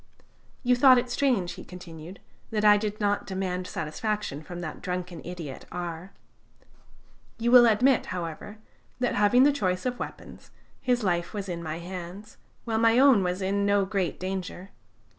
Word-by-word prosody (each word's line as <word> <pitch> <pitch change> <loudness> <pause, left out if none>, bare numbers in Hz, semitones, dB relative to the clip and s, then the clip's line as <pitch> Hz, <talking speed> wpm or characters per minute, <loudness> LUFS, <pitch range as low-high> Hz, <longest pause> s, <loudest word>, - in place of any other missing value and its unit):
"You 250 0 +4
thought 255 0 +7
it 245 0 -1
strange," 240 -12 +1
he - - -9
continued, 175 0 -11 0.3
"that 215 -2 -1
I 210 0 +8
did 210 0 -2
not 205 -1 0
demand 185 -1 -3
satisfaction 160 0 -3
from 175 +2 -8
that 160 -3 -6
drunken 180 -2 -4
idiot 170 -6 -7
R. 175 +1 -6 1.3
You 235 +1 0
will 245 -1 +9
admit, 245 +4 +3
however, 180 +4 -6 0.4
that 250 -1 0
having 210 +5 +4
the 290 +1 +5
choice 185 -8 -1
of 250 -1 -2
weapons, - - -9 0.3
his 245 -3 +1
life 175 0 -1
was 200 -1 -4
in 170 -2 -4
my 160 -1 -4
hands, 180 +4 -8 0.3
while 225 -2 0
my 230 +1 +4
own 265 -5 +6
was 180 +1 -2
in 200 +1 0
no 200 -1 +3
great 190 -2 -2
danger. 185 0 -5
195 Hz, 160 wpm, -27 LUFS, 180-225 Hz, 1.3 s, will